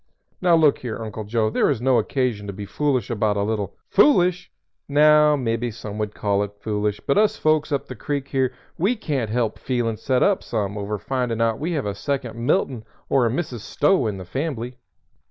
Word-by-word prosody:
Now 175 -2 +5
look 155 -3 +4
here, 120 -3 -5
Uncle 110 -1 -6
Joe, 110 0 0
there - - +2
is 135 -6 0
no 125 0 +3
occasion 115 -3 -1
to 100 - -4
be 100 +1 -6
foolish 130 +1 -1
about 105 -2 +1
a 100 - +1
little 105 -2 -2
" - - -56
"Foolish? 185 - +4 0.4
Now, 150 +1 +6
mebby 120 -2 -1
some 105 -2 -7
would 105 -1 -3
call 100 -1 0
it 105 0 -4
foolish, 105 -1 -1
but 140 - +2
us 215 -1 +3
folks 155 -1 +1
up 140 - 0
the - - -7
creek 140 -2 -3
here 130 -2 +1 0.3
we 200 +9 +2
can't 140 - -2
help 115 -1 -1
feelin' 120 -4 -1
set 130 +1 +1
up 200 -2 +3
some 105 -3 -3
over 105 +1 -3
findin' 120 +3 -2
out 115 -1 +1
we 170 +4 -2
have 145 -7 -1
a 100 - -2
second 130 +2 -3
Milton 115 0 0 0.3
or 130 -4 +3
a - - +1
Mrs. 130 -1 -3
Stowe 135 - +1
in 105 -2 -3
the 95 - -8
fambly." 125 - -4
120 Hz, 210 wpm, -23 LUFS, 105-145 Hz, 0.4 s, Now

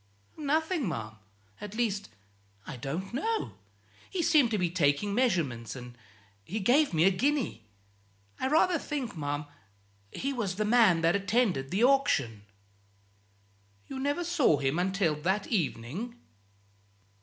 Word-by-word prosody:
"Nothing, 310 - 0
ma'am 110 -8 -4 0.5
at 210 0 -7
least, 215 - -1 0.6
I - - -7
don't 160 - -5
know. 445 - -1 0.6
He 365 -3 -2
seemed 305 -7 +4
to 215 - 0
be 175 -3 0
taking 170 +3 +1
measurements, 165 - 0
and 125 -1 -9 0.5
he 190 - -4
gave 265 +9 +3
me 160 -2 +2
a 195 - +6
guinea. 255 - -1 0.7
I 260 - 0
rather 325 +4 +3
think, 275 -9 -4
ma'am, 145 -1 -3 0.7
he 275 +1 -3
was 210 -8 -2
the 215 +2 -1
man 210 -7 +4
that 165 +2 +3
attended 200 - +1
the 200 +5 +1
auction." 145 - +2 1.4
"You 265 - -7
never 285 +6 -1
saw 325 - +3
him 140 +5 0
until 185 -3 +1
that 190 +5 0
evening?" 180 - -2
200 Hz, 130 wpm, -29 LUFS, -, 1.4 s, a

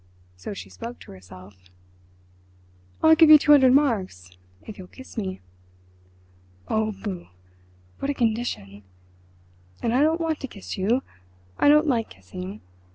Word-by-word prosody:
—so 90 - -8
she 200 - -8
spoke 235 +1 -9
to - - -13
herself. 95 0 -15 1.3
"I'll 320 0 +7
give 320 -1 +6
you 310 - +11
two 295 0 +2
hundred 265 -3 +7
marks 195 - 0 0.3
if 210 - -10
you'll 185 - -10
kiss 260 +7 -14
me." 190 -5 -4 1.3
"Oh, 220 0 0
boo! 190 -5 -5 0.7
What 275 - -3
a 285 - -1
condition! 215 - -2 1.0
And 230 - -1
I 255 - +3
don't 320 +3 +2
want 325 -2 -2
to 270 - -5
kiss 200 -6 -8
you—I 90 - -2
don't 300 +1 +5
like 235 -6 0
kissing. 95 +2 -9
220 Hz, 140 wpm, -24 LUFS, -, 1.3 s, you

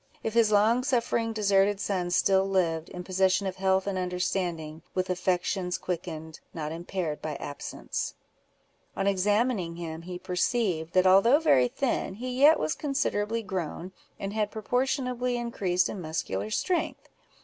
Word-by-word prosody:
—if 220 - -2
his 230 -2 +4
long 220 +4 +4
suffering 235 -3 0
deserted 200 -2 +2
son 185 -3 -1
still 190 +2 +3
lived, 165 -4 0
in 180 - -7
possession 190 +1 +2
of 190 -1 -3
health 190 0 +2
and 195 -2 -1
understanding, 180 -3 -2
with 185 0 0
affections 180 0 0
quickened, 160 -3 -5 0.2
not 155 -2 -3
impaired 170 -1 -4
by 155 -1 -4
absence? 145 +1 -5 0.8
On 195 - 0
examining 200 -1 +1
him, 165 -1 -6
he 180 +1 -6
perceived, 180 -2 -1
that 185 0 +4
although 195 +8 +6
very 135 - +4
thin, 235 - -2
he 250 +4 -5
yet 300 +3 +8
was 155 0 0
considerably 230 -6 -1
grown; 185 -2 -4 0.3
and 195 +1 -4
had 215 -1 0
proportionably 250 +2 -1
increased 190 -7 0
in 195 - -6
muscular 130 - -3
strength. 355 - -1
190 Hz, 145 wpm, -28 LUFS, 175-220 Hz, 0.8 s, yet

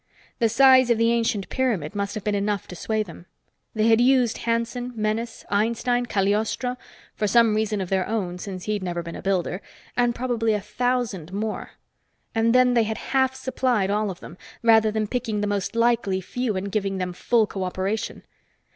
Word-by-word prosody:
The 230 -2 +3
size 260 +1 +6
of 235 - +4
the 230 +1 +3
ancient 225 -4 0
pyramid 215 - -1
must 200 +1 -3
have 215 - -5
been 210 - 0
enough 205 -1 -1
to 180 - -7
sway 215 +5 -1
them. 175 -2 -13 0.5
They 215 0 +2
had 225 0 +5
used 250 -2 +3
Hanson, 235 +2 -1
Menes, 220 +2 -2
Einstein, 235 +4 +1
Cagliostro 215 +5 0 0.4
for 210 - -1
some 230 +1 +4
reason 215 -1 0
of 185 - -4
their 190 -1 0
own, 190 -5 -2
since 185 -2 -6
he'd 210 -1 -2
never 175 -2 -3
been 170 0 -7
a - - -7
builder 190 -1 -1 0.3
and 240 -1 +2
probably 235 -3 0
a - - 0
thousand 210 -4 -2
more. 215 +2 -4 0.6
And 230 +1 +2
then 255 0 +5
they 230 -2 +3
had 220 0 -3 0.2
half 265 -1 +3
supplied 255 -6 0
all 210 0 0
of 180 - -7
them, 175 - -11 0.2
rather 220 -1 +5
than 215 0 -1
picking 225 -2 -2
the - - 0
most 205 +1 -2
likely 230 -5 +2
few 230 +3 -3
and 195 +1 -3
giving 195 -2 -1 0.2
full 225 +5 +2
cooperation. 190 +2 -3
215 Hz, 180 wpm, -24 LUFS, 200-235 Hz, 0.6 s, size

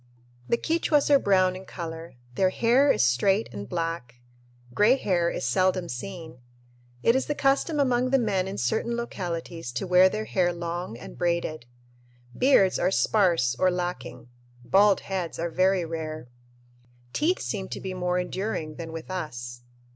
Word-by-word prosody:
The 235 - +3
Quichuas 305 -1 +1
are 280 - +7
brown 185 -4 +3
in 185 - -8
color. 165 -5 -8 0.2
Their 185 +8 +2
hair 245 +8 +3
is - - +2
straight 190 - +2
and 100 +2 -7
black. 165 -7 -3 0.6
Gray 215 - +5
hair 175 -9 0
is - - -4
seldom 185 +6 +1
seen. 160 +1 -7 0.6
It 230 - +4
is 265 - 0
the 295 - -1
custom 280 +3 +1
among 255 -2 +2
the 270 - +4
men 200 -6 0
in 195 - -5
certain 235 - -1
localities 170 - -5
to 120 - -3
wear 180 +1 +6
their 215 +2 -4
hair 180 -4 +1
long 170 -6 -5
and 125 - -11
braided. 170 -6 -1 0.7
Beards 250 -8 +4
are 180 - +2
sparse 175 - +2
or 185 - +4
lacking. 175 -9 -5 0.4
Bald 200 +4 +4
heads 185 -4 -4
are 170 0 -3
very 185 0 +2
rare. 155 -4 -6 0.8
Teeth 345 +5 +1
seem 195 -3 -4
to - - -5
be 190 -1 -5
more 180 0 -1
enduring 180 -4 -3
than 165 -1 -6
with 165 +3 -7
us. 120 -9 -6
180 Hz, 160 wpm, -26 LUFS, 165-205 Hz, 0.8 s, are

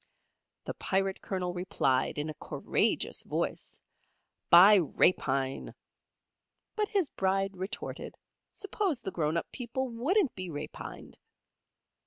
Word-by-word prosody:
The - - -4
Pirate 195 -1 -1
Colonel 180 -2 -3
replied, 150 -9 0
in 145 +1 -2
a 155 - -4
courageous - - 0
voice, - - -3 0.7
"By 185 +5 +9
rapine!" 135 -5 +1 1.0
But 425 -1 +1
his 390 -8 0
Bride 195 0 0
retorted, 190 +6 -6 0.4
suppose 395 - -1
the 190 - -3
grown 160 -1 0
up - - -4
people 255 +1 -3
wouldn't 285 - +1
be 185 -1 -6
rapined? 150 -1 -8
190 Hz, 110 wpm, -30 LUFS, 170-245 Hz, 1.0 s, By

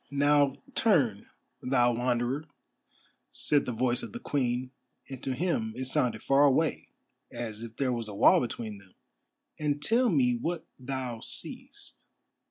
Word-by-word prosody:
"Now 140 -1 +3 0.2
turn, 140 - +2 0.3
thou 120 -2 +3
Wanderer," 125 +4 0 0.9
said 145 -1 +1
the - - 0
voice 120 +1 0
of - - -8
the 235 - -5
Queen, 130 - -1 0.4
and 135 -2 -8
to 130 - -2
him 120 -10 -1
it 130 - -4
sounded 120 -4 0
far 135 +1 +4
away, 145 +2 +2 0.4
as 110 -2 -5
if 115 -1 -9
there 130 -2 +1
was 115 -2 -3
a 105 - -7
wall - - +6
between 110 -4 -5
them, 95 -2 -21 0.6
"and 150 -1 0
tell 230 - +3
me 125 - +3
what 160 +7 -3
thou 130 -2 -4
seest." - - -6
130 Hz, 150 wpm, -29 LUFS, 120-145 Hz, 0.9 s, wall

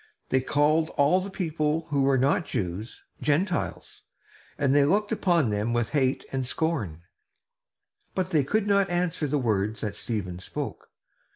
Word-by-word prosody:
They 130 - +2
called 150 +4 +2
all 150 +6 +4
the 195 - -5
people 160 -4 -1
who 140 -1 +2
were 135 0 +3
not 135 +6 +2
Jews 105 -1 -4 0.2
"Gentiles," 170 +4 -1 0.6
and 140 -2 +2
they 145 0 +5
looked 205 +8 +2
upon 170 - +2
them 105 +3 -1
with 120 -2 0
hate 135 -3 +1
and 135 -1 -1
scorn; 125 - -1 1.1
but 185 -1 -1
they 150 -3 +3
could 210 +10 0
not 200 -2 +3
answer 175 -3 0
the 145 +2 0
words 110 -4 0
that 105 -2 -2
Stephen 100 -5 -4
spoke. 95 - -6
145 Hz, 155 wpm, -26 LUFS, 120-170 Hz, 1.1 s, they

